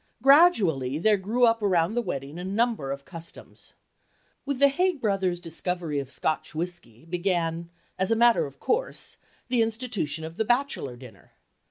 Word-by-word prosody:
Gradually 205 - +5
there 210 +6 +4
grew 215 +6 +2
up 230 -1 +2
around 180 -2 +2
the 240 - +1
wedding 145 - -5
a - - -5
number 200 - 0
of 140 0 -6
customs. 165 -2 -12 0.7
With 280 -2 -1
the 280 +2 +6
Haig 355 +2 0
brothers' 195 -6 0
discovery 170 -2 -3
of 135 -2 -6
Scotch 155 0 -2
whiskey 165 -8 -5
began, 170 -1 -1 0.3
as 190 - +1
a 225 - +3
matter 235 -6 +4
of 140 0 -15
course, 470 +3 -2 0.3
the 245 -2 +3
institution 225 - -2
of 160 +1 -8
the - - +2
"bachelor 240 - 0
dinner." 120 -5 -15
185 Hz, 160 wpm, -26 LUFS, 160-235 Hz, 0.7 s, the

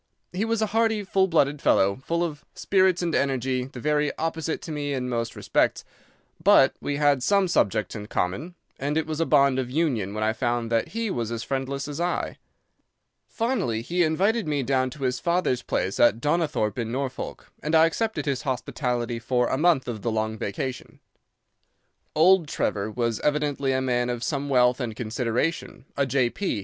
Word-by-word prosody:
He 195 +5 -1
was 225 -1 0
a 215 - -3
hearty, 225 -2 +2
full 190 0 +2
blooded 150 -4 +1
fellow, 100 +1 +3
full 170 +6 -1
of 150 -4 -4
spirits 185 -2 +2
and 170 -2 -1
energy, 130 -2 0
the 130 -1 -10
very 150 +2 +1
opposite 160 0 -2
to 165 - -6
me 145 -2 -2
in 125 -1 -2
most 115 -2 -2
respects, - - 0 0.6
but - - +6
we 145 - -2
had 145 -2 +3
some 200 +6 +3
subjects 105 - +1
in 105 -1 -6
common, 130 - -2 0.2
and 145 +3 -1
it 160 - +1
was 155 0 -4
a 165 - +1
bond 140 -1 +4
of 125 -2 -2
union 125 - -1
when 110 - -1
I 110 +1 +2
found 120 0 -1
that 115 -1 +1
he 225 -1 -3
was 115 -6 -2
as 115 -1 -3
friendless 135 +1 -3
as 145 +1 -6
I. 175 +1 -2 0.9
Finally, 205 - -1
he 175 +7 -1
invited 195 +6 +1
me 145 -2 0
down 130 0 +1
to 135 +2 -9
his 125 -1 0
father's 170 -8 0
place 95 -4 -2
at 115 -1 +5
Donnithorpe, 145 -6 0
in 115 -1 -2
Norfolk, 130 +1 -5
and 155 +2 0
I 160 0 +7
accepted 220 +7 -1
his 140 -3 -1
hospitality 125 -2 -2
for 125 +1 0
a - - +1
month 160 -6 +3
of 115 -4 -4
the 115 - -1
long 110 0 -1
vacation. 125 +5 -5 1.2
"Old 170 +1 +5
Trevor 105 -7 -1
was 115 0 -1
evidently 145 -2 0
a 130 0 +1
man 125 -1 0
of 120 -1 -3
some 140 +3 -2
wealth 125 -1 +3
and 120 -4 -3
consideration, 120 +7 -2
a 140 -1 +1
J.P. 130 - 0
135 Hz, 185 wpm, -25 LUFS, 120-165 Hz, 1.2 s, I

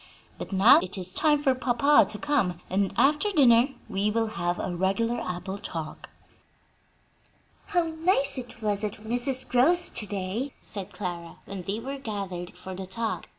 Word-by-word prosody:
But - - -7
now 195 +5 +7
it 185 +2 -5
is 185 0 -3
time 295 +2 +2
for 270 -3 +4
papa 255 +3 +4
to 210 - -2
come, 255 - 0
and 195 +1 +1
after 295 - +3
dinner 255 - +5 0.2
we 195 +2 0
will 225 +1 +1
have 175 -3 -2
a 175 - -3
regular 195 +6 0
apple 185 +2 -5
talk." 160 -5 -7 1.6
"How 360 -4 +2
nice 320 -2 +1
it 245 -3 -8
was 205 -1 0
at 210 -1 -2
Mrs. 245 +4 -3
Grove's 325 +9 +4
to 210 - -1
day!" 205 +8 -3
said 200 -1 -7
Clara, 175 -3 -6
when 195 -2 -6
they 195 +5 -3
were 275 +4 -6
gathered 195 -7 -5
for 190 - -8
the 190 0 -7
talk. 220 +4 -3
215 Hz, 165 wpm, -27 LUFS, 190-265 Hz, 1.6 s, now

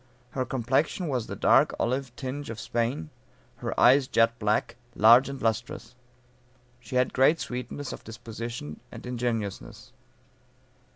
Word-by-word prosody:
Her 130 -1 -2
complexion 135 - 0
was 125 -5 -2
the - - -5
dark - - +4
olive 130 +1 -1
tinge 135 +3 -5
of 115 -1 -6
Spain; 115 -9 -2 0.5
her - - -4
eyes 130 +2 +6
jet 115 -1 +2
black, 105 +2 0 0.2
large 120 +5 +7
and 135 -1 -6
lustrous. 115 +1 -2 0.9
She 125 +1 -8
had 125 0 +2
great 145 +5 +4
sweetness 125 +3 -5
of - - -10
disposition 115 -7 -7
and - - -10
ingenuousness. 115 - -4
120 Hz, 130 wpm, -27 LUFS, 115-130 Hz, 0.9 s, large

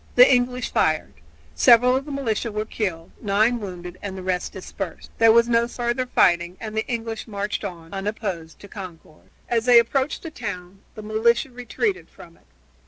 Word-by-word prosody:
The 250 +2 +8
English 250 0 0
fired; 155 -1 +1 0.4
several 235 - +6
of 270 +1 -1
the 300 - -7
militia 235 -4 -2
were 210 +1 -2
killed, 180 -7 -4
nine 215 +3 +2
wounded, 180 -3 -8
and 195 -2 -6
the 185 - -7
rest 180 -1 -2
dispersed. 190 -1 -7
There 225 0 +7
was 235 +1 +5
no 235 0 +2
further 240 +1 -2
fighting 175 -5 +2
and 215 -1 -6
the 220 - -1
English 225 -2 -4
marched 205 0 -3
on, 170 -3 -7
unopposed, 195 -5 -4
to 200 - -11
Concord. 180 -6 -11 0.2
As 230 -1 0
they 245 -1 +7
approached 260 +4 +2
the 330 - -6
town 185 -8 -7 0.2
the 215 - -8
militia 225 +4 +1
retreated 315 - -3
from - - -15
it. - - -28
220 Hz, 175 wpm, -23 LUFS, 185-240 Hz, 0.4 s, The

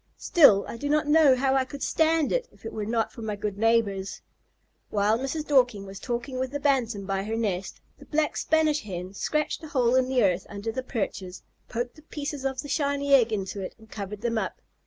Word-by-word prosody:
Still, 215 - +5
I - - -6
do 285 +4 -3
not 300 +1 +2
know 295 -3 +6
how 265 +1 +1
I 265 -1 +3
could 275 +2 -7
stand 320 -1 +2
it - - 0
if - - -20
it 225 - -5
were 210 -1 -4
not 225 -1 0
for 235 - -10
my 215 -2 -3
good 205 -1 -4
neighbors." 215 -4 +1 0.7
While 210 +2 +2
Mrs. 285 +4 -3
Dorking 245 -9 +3
was 195 0 -9
talking 245 +3 -4
with 260 0 -1
the 285 +2 -4
Bantam 245 -8 +1
by 195 0 -1
her 220 +2 -3
nest, 200 -5 -2 0.2
the - - -13
Black 300 -1 0
Spanish 310 -1 +2
Hen 185 -2 -6
scratched 305 +9 -1
a - - -6
hole 250 -5 +2
in 260 0 +3
the 255 -3 +3
earth 185 -2 +1
under 205 +2 -4
the 260 - -3
perches, 195 -7 -4 0.3
poked 245 +4 -4
the - - -14
pieces 290 -2 -5
of 265 -1 -1
the - - -7
shiny 280 -1 0
egg 240 -4 +6
into 200 -1 -3
it, 185 - -6
and 220 -1 -19
covered 205 0 -6
them 230 -1 0
up. - - -4
240 Hz, 220 wpm, -26 LUFS, 205-285 Hz, 0.7 s, know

